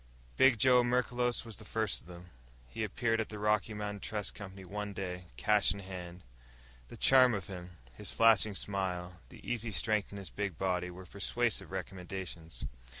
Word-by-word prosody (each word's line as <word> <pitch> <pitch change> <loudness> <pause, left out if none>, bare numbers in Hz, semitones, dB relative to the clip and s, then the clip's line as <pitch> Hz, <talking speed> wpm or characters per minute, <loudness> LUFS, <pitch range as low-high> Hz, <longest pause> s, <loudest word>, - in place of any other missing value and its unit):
_Big 130 -2 +6
Joe 125 +2 +6
Merklos 120 0 +1
was 110 -4 -6
the - - -8
first 110 -2 -1
of - - -19
them. 90 0 -11 0.4
He 60 - -4
appeared 115 +2 +1
at 110 - -4
the 105 - -6
Rocky 105 0 +1
Mountain 105 -1 -4
Trust 105 -1 -3
Company 95 -1 -9
one 105 +2 -4
day, 90 -2 -4
cash 105 - +3
in - - -7
hand. 90 -2 -8 0.6
The - - -10
charm 130 -3 +6
of 100 -3 -4
him, 90 -2 -9 0.2
his - - -6
flashing 110 -2 +5
smile, 90 -3 -2
the - - -13
easy 120 -1 0
strength 105 0 +1
in 100 - -7
his 100 -2 -7
big 100 -6 -3
body, 90 -1 0
were 90 +1 -9
persuasive 115 +5 0
recommendations. 90 -3 -5
100 Hz, 175 wpm, -33 LUFS, 90-110 Hz, 0.6 s, Big